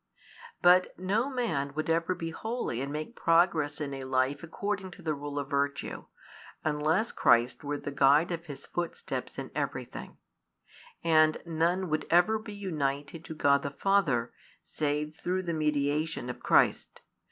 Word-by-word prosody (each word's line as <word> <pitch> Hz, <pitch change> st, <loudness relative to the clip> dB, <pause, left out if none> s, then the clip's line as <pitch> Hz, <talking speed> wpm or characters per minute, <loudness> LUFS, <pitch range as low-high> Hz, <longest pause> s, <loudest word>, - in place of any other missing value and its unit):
But 180 Hz, +1 st, +5 dB
no 205 Hz, +8 st, 0 dB
man 160 Hz, -, -1 dB
would 155 Hz, -, -2 dB
ever 165 Hz, +2 st, +1 dB
be 165 Hz, -1 st, -4 dB
holy 220 Hz, -, -3 dB
and 140 Hz, +1 st, -3 dB
make 155 Hz, +10 st, -5 dB
progress 165 Hz, -3 st, +2 dB
in 145 Hz, -2 st, -3 dB
a 135 Hz, -1 st, -5 dB
life 130 Hz, +2 st, 0 dB
according 195 Hz, +3 st, -3 dB
to 180 Hz, -, -14 dB
the 160 Hz, -1 st, 0 dB
rule 145 Hz, 0 st, -6 dB
of 140 Hz, -1 st, -2 dB
virtue, 140 Hz, 0 st, -1 dB, 0.6 s
unless 155 Hz, +8 st, +1 dB
Christ 120 Hz, +5 st, +3 dB
were 145 Hz, 0 st, -2 dB
the 145 Hz, -, -6 dB
guide 140 Hz, +5 st, +4 dB
of 170 Hz, 0 st, -4 dB
his 145 Hz, -3 st, -8 dB
footsteps 175 Hz, -, -4 dB
in -, -, -6 dB
everything: -, -, -4 dB, 0.9 s
and 155 Hz, -1 st, +4 dB
none 170 Hz, +3 st, 0 dB
would 155 Hz, 0 st, -1 dB
ever 180 Hz, +6 st, +4 dB
be 215 Hz, -1 st, -9 dB
united 150 Hz, -5 st, -3 dB
to 160 Hz, -, -7 dB
God 140 Hz, -2 st, +3 dB
the 140 Hz, -, -3 dB
Father 140 Hz, -6 st, +1 dB, 0.3 s
save 150 Hz, 0 st, -2 dB
through 185 Hz, +1 st, -1 dB
the 170 Hz, -2 st, -2 dB
mediation 150 Hz, -2 st, 0 dB
of -, -, -11 dB
Christ. -, -, +2 dB
155 Hz, 155 wpm, -29 LUFS, 145-180 Hz, 0.9 s, But